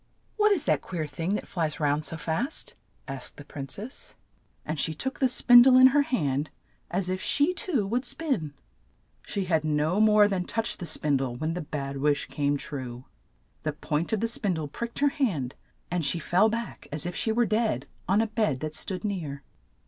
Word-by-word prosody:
"What 425 -1 +4
is 360 -7 +2
that - - +2
queer 170 -4 -4
thing 165 +7 -2
that - - -4
flies 160 -4 -2
round 150 0 +1
so 160 - -1
fast? 200 - -2
' - - -41
' - - -38
asked 135 -2 -6
the 145 - -10
prin 140 -2 -7
cess, 220 - -8 0.5
and 155 0 -3
she 160 +2 +1
took 265 - -4
the 265 - +4
spin 245 -1 +7
die 255 +1 +7
in 260 - +10
her 290 +2 +4
hand 150 - 0 0.4
as 180 +1 -1
if 185 0 -2
she 295 +5 +2
too 300 - 0
would 240 +6 0
spin. 260 - -2 0.7
She 200 -2 -3
had 160 -4 +1
no 155 +5 +1
more 210 -1 +6
than 190 -3 -1
touched 225 +3 -2
the 175 - -5
spin 145 -3 +1
die 135 - -1
when 140 +7 -3
the 180 - -3
bad 140 -2 -4
wish 145 +1 +1
came 145 -1 0
true 130 -3 -6 0.3
— - - -40
the 155 -1 -2
point 150 +2 -2
of 220 -2 0
the 230 - +2
spin 205 -5 -1
die 160 -1 -3
pricked 235 +11 -6
her 285 0 +4
hand, 170 - -1 0.4
and 175 -2 0
she 145 - +2
fell 180 +6 +3
back 230 +1 -5
as 150 +1 -3
if 175 - -3
she 220 - 0
were 240 +2 +3
dead 220 +1 0 0.2
on 200 +3 +4
a - - +2
bed 215 - 0
that 155 0 -3
stood 185 +4 -4
near. 160 -9 -4
175 Hz, 215 wpm, -27 LUFS, 150-230 Hz, 0.7 s, in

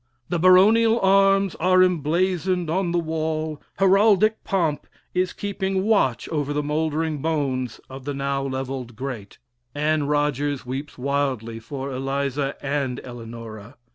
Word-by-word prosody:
The 175 - 0
baronial 215 +6 +5
arms 195 -1 +4
are 185 +2 +5
emblazoned 180 +1 0
on 180 0 0
the 175 - +1
wall; 160 -2 -2 0.2
heraldic 200 +2 +4
pomp 170 -7 -1 0.3
is 180 0 +1
keeping 195 -1 -2
watch 165 - +2
over 145 -2 -1
the 150 0 -1
mouldering 155 0 -1
bones 135 -6 -1
of 130 0 -10
the 145 -1 -3
now 140 0 -1
levelled 130 -3 -4
great. 120 -5 -6 0.4
Anne 150 0 +1
Rogers 145 -2 0
weeps 135 +4 -6
wildly 130 -4 -2
for 135 +4 -6
Eliza 135 +1 -2
and 135 -3 -1
Eleanora. 115 -1 -9
150 Hz, 130 wpm, -23 LUFS, 135-185 Hz, 0.4 s, baronial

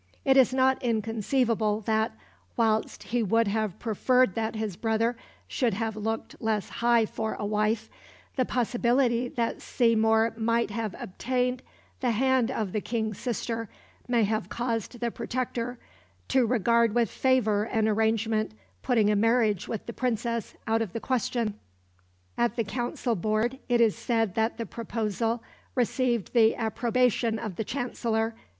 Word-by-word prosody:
It 270 -1 +5
is 260 -2 +6
not 260 +1 +2
inconceivable 225 -1 0
that, 220 +1 0 0.4
whilst 220 -2 +1
he 240 +1 -1
would 225 +1 +2
have 215 -2 -1
preferred 245 0 +2
that 225 +2 -2
his 215 -4 -3
brother 225 +3 0 0.3
should 240 -7 0
have 220 0 -2
looked 225 +1 -4
less 220 -3 -1
high 235 -1 +3
for 220 +1 -3
a 205 - -4
wife, 215 +1 0 0.5
the 260 - +2
possibility 245 0 +1
that 235 -1 -2
Seymour 225 -1 +3
might 230 0 +1
have 220 -1 -3
obtained 250 +5 -2 0.4
the 250 - 0
hand 255 +1 +2
of 220 -7 -2
the 215 - -1
King's 220 -2 -2
sister 230 -2 -3 0.4
may 240 -2 +3
have 210 -2 -1
caused 235 0 -3
the 235 -1 0
Protector 245 0 -3 0.5
to 260 -3 +3
regard 235 -1 +3
with 235 -1 +2
favour 220 -6 +2
an 220 -2 +1
arrangement 220 0 +1 0.3
putting 225 -5 +3
a - - +2
marriage 215 -2 +2
with 220 - -4
the 235 - -6
Princess 235 -2 -2
out 225 +1 +1
of 215 -6 -3
the 230 - -2
question. 240 -4 -1 0.8
At 240 0 +2
the 230 - 0
Council 240 +2 -2
Board 215 +7 0
it 240 -1 +3
is 225 -3 +4
said 225 -5 0
that 225 +2 0
the 230 - -3
proposal 225 0 -2 0.3
received 245 -3 0
the 225 -2 +5
approbation 235 0 +1
of 215 -5 -5
the 220 - -2
Chancellor. 230 -2 -1
230 Hz, 150 wpm, -27 LUFS, 220-245 Hz, 0.8 s, is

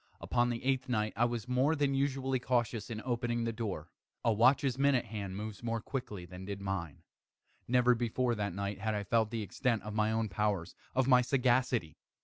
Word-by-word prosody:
Upon 120 0 +1
the 115 -1 -3
eighth 130 -1 +1
night 110 -3 0
I 120 - +3
was 120 -1 -3
more 130 +5 +2
than 140 -2 +1
usually 135 -1 0
cautious 120 -3 0
in 110 -1 -5
opening 120 -1 -1
the 115 0 -1
door. 100 -9 -4 0.3
A 115 - +4
watch's 130 +3 +4
minute 140 -3 +3
hand 100 -3 -5
moves 105 -1 -6
more 115 -1 -1
quickly 105 -7 -5
than 90 +1 -9
did 100 0 -5
mine. 95 -6 -4 0.6
Never 125 0 +4
before 120 +1 0
that 100 -5 -2
night 100 0 -3
had 110 +1 -1
I 105 - -2
felt 110 +2 +2
the 115 -1 -3
extent 115 +4 -1
of 105 - -6
my 110 0 +2
own 110 0 0
powers 100 -2 -1 0.2
of 130 0 +3
my 125 -2 +7
sagacity. 125 - +1
115 Hz, 195 wpm, -32 LUFS, 105-125 Hz, 0.6 s, my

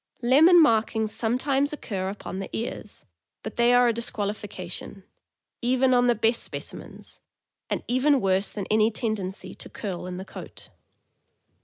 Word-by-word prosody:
Lemon 315 +9 +7
markings 220 -6 +3
sometimes 270 +5 +1
occur 195 -10 -4
upon 195 -1 -6
the 195 - -5
ears, 230 - -6 0.4
but - - -6
they 235 0 +4
are 245 0 +5
a 235 - +2
disqualification, 205 -4 -5 0.6
even 255 +1 +3
on 245 0 +4
the 240 - +4
best 225 +2 0
speci - - -5
mens, - - -12 0.5
and - - -2
even 265 +3 +3
worse 195 -1 +1
than 200 -3 -5
any 215 0 +4
tendency 215 -4 -4
to - - -9
curl 180 -3 -5
in 180 0 -5
the 190 - -6
coat. - - -10
225 Hz, 150 wpm, -25 LUFS, 200-250 Hz, 0.6 s, Lemon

